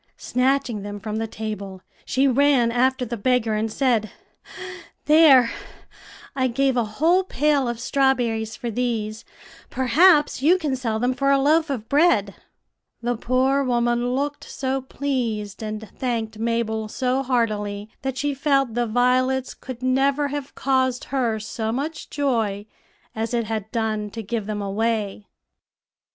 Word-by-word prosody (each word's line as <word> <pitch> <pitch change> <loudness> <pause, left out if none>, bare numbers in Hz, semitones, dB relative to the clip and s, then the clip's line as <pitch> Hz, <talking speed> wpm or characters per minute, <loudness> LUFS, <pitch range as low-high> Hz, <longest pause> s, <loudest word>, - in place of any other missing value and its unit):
Snatching 255 -3 0
them 205 0 -6
from 215 +1 -4
the 225 0 -2
table, 205 -4 -6 0.2
she 270 +1 +2
ran 265 -2 +3
after 255 +2 +1
the 235 0 -4
beggar, 235 0 +1
and 215 +1 -1
said, 230 -4 +1 0.9
"'There, 295 -6 +6 0.8
I 260 -1 +1
gave 265 +2 +1
a 240 - +2
whole 345 +5 +4
pail 295 -6 +1
of 235 -1 -3
strawberries 240 -4 0
for 235 - -5
these; 220 -2 -2 0.5
perhaps 295 +3 +4
you 335 +6 +5
can 300 -7 -1
sell 230 -4 -2
them 245 +3 +1
for 275 +2 0
a 275 - +5
loaf 310 +3 +3
of 235 -6 -4
bread.'" 280 - +3 0.7
The 240 +1 0
poor 260 +4 +1
woman 240 0 +1
looked 290 +2 -2
so 270 0 -3
pleased, 240 -7 -3
and 215 0 -5
thanked 225 -4 -3
Mabel 225 -1 -1
so 255 +4 -1
heartily, 210 -5 -1
that 265 -1 -3
she 290 +1 0
felt 275 -3 +1
the 240 0 0
violets 255 +3 +1
could 255 -1 -9
never 275 +3 +2
have 285 -1 -6
caused 260 -2 +1
her 235 -5 0
so 220 +1 -3
much 285 +7 -4
joy 225 -8 -1 0.5
as 225 +2 -2
it 235 - +1
had 220 -1 -4
done 220 -3 -1
to 225 +2 -7
give 215 0 -3
them 210 -1 -3
away. 210 0 -2
245 Hz, 145 wpm, -23 LUFS, 220-270 Hz, 0.9 s, There